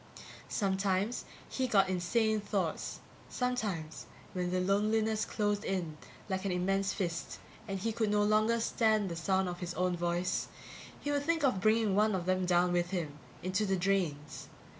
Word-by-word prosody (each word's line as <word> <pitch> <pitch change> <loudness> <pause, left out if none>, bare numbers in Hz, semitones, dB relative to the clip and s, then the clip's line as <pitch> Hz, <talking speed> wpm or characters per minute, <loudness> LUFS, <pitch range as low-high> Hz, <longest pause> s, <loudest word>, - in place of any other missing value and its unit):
Sometimes 195 +2 0 0.2
he 260 -1 -1
got 195 -5 +4
insane 215 +5 +1
thoughts. 195 -5 -2 0.3
Sometimes, 210 -11 -2 0.3
when 180 -1 -1
the 185 +1 0
loneliness 215 +3 +1
closed 205 -1 -1
in 180 -6 -2 0.3
like 190 -2 -2
an 195 - -1
immense 195 +2 +1
fist 175 -5 -3 0.3
and 195 -1 -2
he 225 +4 -1
could 220 -1 0
no 205 0 +3
longer 215 +2 +3
stand 220 -3 +2
the 170 - -4
sound 190 +3 +1
of 175 0 -4
his 175 -1 -4
own 180 0 +1
voice, 175 +1 -1 0.5
he 290 - -2
would 285 0 +1
think 325 +1 0
of 250 -9 +2
bringing 215 -1 +3
one 210 0 +3
of 180 -2 -2
them 185 0 +1
down 175 0 +3
with 175 0 +1
him, 160 -6 -3 0.2
into 185 +3 0
the 195 -2 +1
drains. 175 -6 -1
195 Hz, 165 wpm, -32 LUFS, 180-215 Hz, 0.5 s, got